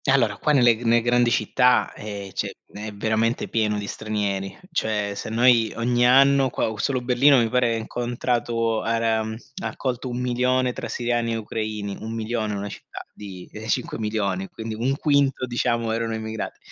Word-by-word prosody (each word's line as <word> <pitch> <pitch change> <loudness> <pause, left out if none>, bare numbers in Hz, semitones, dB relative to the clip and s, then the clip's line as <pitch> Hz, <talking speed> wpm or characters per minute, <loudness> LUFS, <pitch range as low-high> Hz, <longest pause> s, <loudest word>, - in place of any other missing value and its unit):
Allora 120 -6 +3
qua 150 - +1
nelle 120 -5 +5
g - - -12
ne 120 0 +4
grandi 120 0 +3
città, 125 +3 +2
ehm, 100 -2 -7
c'è - - -2 0.2
è 105 +1 -6
veramente 110 +3 0
pieno 105 -2 0
di 105 - -4
stranieri, 100 -3 -3
cioè 105 -9 -1
se - - -5
noi 115 -1 +4
ogni 120 +1 +2
anno 135 +1 +5
qua 110 - -1
solo 130 +4 0
Berlino, 130 +3 +5
mi 115 -2 +2
pare, 125 -1 +2
incontrato, 115 -1 -1
ara 115 -1 +1
mhmm, 110 0 -5 0.3
ha - - -2
accolto 130 -1 -3
1000000 125 +1 +1
tra 120 - -5
siriani 120 0 -1
e - - -1
ucraini, 110 -2 -4
1000000, 110 -1 -3
una 100 0 -4
città - - -9
di, 95 -3 -9
ehm, 110 +1 -8
5000000, 100 -5 -1
quindi 110 +2 -6
1/5 135 +3 +1
diciamo 120 -2 0
erano 115 0 -1
immigrati. 110 0 -5
115 Hz, 160 wpm, -24 LUFS, 110-125 Hz, 0.3 s, nelle